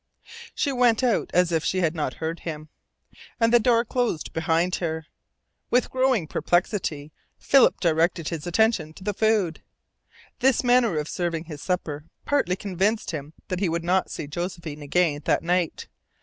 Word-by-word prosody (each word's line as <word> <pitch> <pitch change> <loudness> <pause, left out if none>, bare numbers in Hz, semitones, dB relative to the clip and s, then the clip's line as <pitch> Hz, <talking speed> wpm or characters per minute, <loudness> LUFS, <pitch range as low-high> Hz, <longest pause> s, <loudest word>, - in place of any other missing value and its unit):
She 285 - 0
went 245 -2 +3
out 245 -3 +1
as 180 0 +3
if 165 -2 +1
she 190 - 0
had 165 -3 +1
not 150 -6 -3
heard 160 +1 -4
him, 155 -2 -7 0.7
and 230 0 +3
the 240 - +7
door 235 0 +3
closed 240 -9 -2
behind 165 +2 +1
her. 160 -2 -3 0.6
With 250 +1 +2
growing 255 -8 +2
perplexity, 165 -3 -1 0.3
Philip 275 -2 +4
directed 165 -1 +1
his 165 0 -5
attention 175 -4 +1
to - - -12
the 205 - -1
food. 210 -6 +1 0.8
This 265 -1 +3
manner 245 -7 +3
of 150 0 -2
serving 170 -2 -2
his 150 -3 -9
supper 155 -4 -3 0.2
partly 230 -11 +1
convinced 200 +3 -1
him 150 -1 -6 0.2
that 185 - -2
he 190 -3 +1
would 170 +1 -2
not 185 +2 +1
see - - -5
Josephine 170 -1 -5
again 145 0 +1
that - - +2
night. 175 -1 0
175 Hz, 165 wpm, -25 LUFS, 160-220 Hz, 0.8 s, the